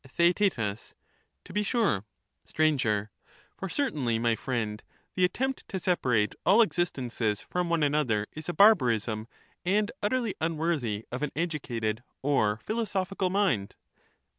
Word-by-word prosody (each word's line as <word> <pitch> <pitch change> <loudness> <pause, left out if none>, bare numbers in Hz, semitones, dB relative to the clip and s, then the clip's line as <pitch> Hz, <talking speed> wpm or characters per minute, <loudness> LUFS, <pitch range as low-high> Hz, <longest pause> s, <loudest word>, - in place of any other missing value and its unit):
TheaeU 155 - +1 0.5
To - - -12
be 210 - +1
sure. 205 - +1 0.4
Sir. 115 -10 +1 0.5
For 195 - -5
certainly, 145 - 0
my 115 0 +2
friend, 110 -4 -3 0.3
the 185 - 0
attempt 265 +8 0
to 190 - -4
separate 125 - +1
all 210 +6 +6
existences 125 - -1
from 180 -1 -2
one 170 -2 +2
another 140 -8 +1
is 155 +2 -7
a - - -1
barbarism 115 - +4 0.4
and 205 +4 +1
utterly 230 0 0
un 160 0 0
worthy 130 -10 -1
of 125 - -4
an 150 - -1
educated 120 -9 -2 0.2
or 110 -7 +2
philosophical 195 -4 -1
mind. 180 - +1
150 Hz, 130 wpm, -28 LUFS, -, 0.5 s, all